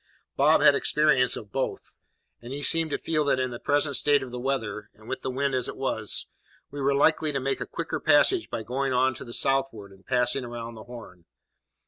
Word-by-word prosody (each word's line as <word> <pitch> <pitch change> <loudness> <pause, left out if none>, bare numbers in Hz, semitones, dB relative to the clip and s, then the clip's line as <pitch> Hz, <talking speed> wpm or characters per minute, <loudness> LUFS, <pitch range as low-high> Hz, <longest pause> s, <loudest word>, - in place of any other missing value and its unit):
Bob - - +4
had - - +7
experience 150 -4 +3
of 105 -2 -9
both; 135 +2 -4 0.5
and 120 +1 -10
he 145 +1 -5
seemed 165 +1 +4
to - - -2
feel 155 -2 -1
that 140 -2 +1
in 130 -1 -2
the 120 - -7
present 145 0 0
state 145 0 +3
of 130 - -9
the 125 - -6
weather, 115 -5 -3
and 110 +1 -18
with 130 - -5
the - - -4
wind 135 +1 -1
as 125 -2 0
it - - -7
was, 110 -5 0 0.5
we 145 0 -6
were 140 +1 +1
likely 155 +1 +2
to 140 - -2
make 135 +1 -2
a - - -4
quicker - - -4
passage 375 -3 +3
by 110 - -4
going 130 +3 -2
on 130 +1 +2
to - - -9
the 120 - -11
southward, 125 -6 -1
and 95 0 -20
passing 125 +1 +1
round 120 -1 -7
the 110 - -11
Horn. 115 -8 -12
130 Hz, 220 wpm, -26 LUFS, 120-140 Hz, 0.5 s, had